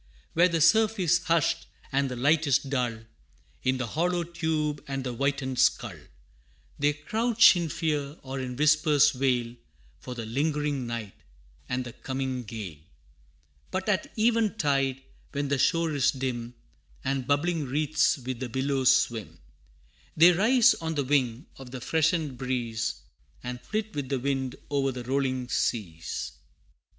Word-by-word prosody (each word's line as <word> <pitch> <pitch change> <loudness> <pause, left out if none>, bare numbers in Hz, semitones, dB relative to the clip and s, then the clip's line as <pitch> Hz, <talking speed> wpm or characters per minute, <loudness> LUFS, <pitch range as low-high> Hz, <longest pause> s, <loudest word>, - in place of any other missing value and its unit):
Where 175 +2 +5
the 165 -2 0
surf 220 +5 +4
is 175 -2 +3
hushed, 165 -2 +1 0.2
and 135 0 +1
the 125 - -4
light 150 +5 +2
is 135 -2 +5
dull, 125 -5 -2 0.6
In 130 0 +1
the 130 - -2
hollow 175 +7 0
tube 160 -3 -2
and 135 -1 -3
the 125 -1 -3
whitened 135 0 -1
skull, - - +2 0.8
They 145 +1 +3
crouch 220 +10 +4
in 170 -2 -1
fear 150 -2 -2
or 135 0 -5
in 125 -1 -4
whispers 150 0 +4
wail, 125 -3 0 0.5
For 125 - -7
the 115 -2 -5
lingering 145 +1 -1
night, 115 -4 -5 0.6
and 125 0 -1
the 120 - -8
coming 130 -2 -4
gale. 100 -9 -7 0.9
But 190 +2 -3
at 205 -3 0
even 225 -1 +2
tide, 135 -6 0 0.3
when 140 -1 -2
the 140 -1 +1
shore 165 +2 +2
is 140 -2 +2
dim, 125 -4 -3 0.5
And 135 -2 -1
bubbling 155 +2 +1
wreaths 150 +3 +2
with 130 -2 -5
the 130 -2 -4
billows 130 +1 +3
swim, 115 -4 -3 0.8
They 170 +3 +8
rise 235 +7 +5
on 160 -1 -4
the 145 - 0
wing 130 -1 0
of 135 -2 -10
the 130 0 -7
freshened 155 -1 0
breeze, 115 -3 -2 0.4
And 125 0 -5
flit 215 - -3
with 140 -3 -4
the 135 - 0
wind 135 -1 -2 0.2
o'er 135 -1 +1
the 125 -1 -6
rolling 130 0 -1
seas. 85 -11 -2
140 Hz, 150 wpm, -27 LUFS, 125-160 Hz, 0.9 s, They